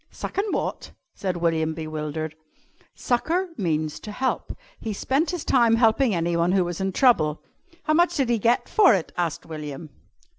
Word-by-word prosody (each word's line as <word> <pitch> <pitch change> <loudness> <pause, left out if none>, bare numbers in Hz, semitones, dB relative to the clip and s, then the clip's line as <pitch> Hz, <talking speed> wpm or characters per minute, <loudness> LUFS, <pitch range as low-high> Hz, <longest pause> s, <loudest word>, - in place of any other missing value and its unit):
"Suckin' 405 +2 -3
wot?" - - -3 0.2
said 185 -3 -3
William, 160 -2 0
bewildered. 155 -1 -4 0.6
"Succour 335 +10 0
means 155 -6 -1
to 210 - -8
help. 260 +5 -2 0.2
He 220 - -4
spent 275 - 0
his 350 -3 -4
time 235 -3 +4
helping 230 0 +3
anyone 170 +1 +1
who 190 -2 +3
was 175 +1 -4
in 190 0 0
trouble." 165 - +3 0.4
"How 310 - +1
much 345 +3 +3
did 265 -4 +1
he 235 -2 +2
get 235 +4 +2
for 400 - +5
it?" 180 - -3
asked 170 -3 -2
William. 150 -1 -7
190 Hz, 160 wpm, -24 LUFS, 160-250 Hz, 0.6 s, for